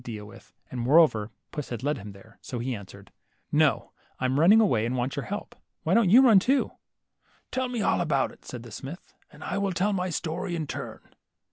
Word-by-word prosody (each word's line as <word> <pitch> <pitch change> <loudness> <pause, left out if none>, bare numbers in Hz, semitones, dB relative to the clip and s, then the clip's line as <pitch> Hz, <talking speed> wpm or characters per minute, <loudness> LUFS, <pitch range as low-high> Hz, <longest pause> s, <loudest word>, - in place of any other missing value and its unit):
35 120 -2 -7
deal 105 -1 -8
with, 115 +3 -15 0.2
and 125 - -4
moreover 125 -5 +4 0.2
puss 150 - -5
had 120 0 -5
led 145 +2 0
him 100 +1 -9
there, 100 +3 -17
so 130 -4 -6
he 125 +1 -2
answered, 100 -3 -12 0.2
— - - -42
No, - - +2 0.3
I'm 130 +2 +1
running 195 +8 +7
away, 125 - +3
and 125 +2 -2
want 125 +2 -2
your 140 - -3
help! 205 - -6 0.3
Why - - +1
don't 230 -5 +4
you 245 +7 +8
run, 225 -7 +7
too? 265 +8 +1 0.3
" - - -55
' - - -36
Tell 260 -1 -1
me 240 -4 -2
all - - +2
about 145 -5 +1
it," - - -19
said 120 -2 -8
the 120 - -11
smith, 140 - -9 0.2
and - - -13
I - - -2
will 200 -1 0
tell 195 +4 +1
my 185 -1 -1
story 175 +2 -3
in 160 -2 -2
turn." - - -6
145 Hz, 235 wpm, -27 LUFS, 120-195 Hz, 0.3 s, you